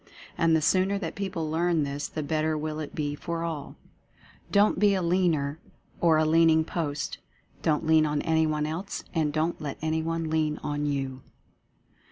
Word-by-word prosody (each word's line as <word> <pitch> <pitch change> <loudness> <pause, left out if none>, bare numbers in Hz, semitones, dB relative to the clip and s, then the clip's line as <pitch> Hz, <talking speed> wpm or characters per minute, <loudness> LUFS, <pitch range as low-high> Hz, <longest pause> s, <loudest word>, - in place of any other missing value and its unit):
And 165 -1 +3
the 160 - +1
sooner 190 +4 +3
that 165 -5 -4
people 190 -5 -3
learn 165 -1 +2
this 140 +1 -3
the 155 - -4
better 155 +1 0
will 155 0 -3
it 155 - -6
be 145 -1 -1
for 165 +3 -4
all. 160 -4 -5 0.8
Don't 205 +1 +4
be 205 -1 +4
a 190 - 0
Leaner, 165 -4 +1 0.4
or 165 -2 +4
a 155 - +3
Leaning 160 0 +5
post. 150 -4 -3 0.4
Don't 155 0 +1
lean 160 -1 +4
on 150 0 0
any 160 -1 +2
one 150 -1 0
else 165 +6 -4
— - - -27
and 155 -4 +1
don't 160 +3 -1
let 145 -3 -4
anyone 160 +1 -1
lean 155 -1 +1
on 145 0 -1
you. 135 -2 -2
160 Hz, 180 wpm, -27 LUFS, 150-165 Hz, 0.8 s, Leaning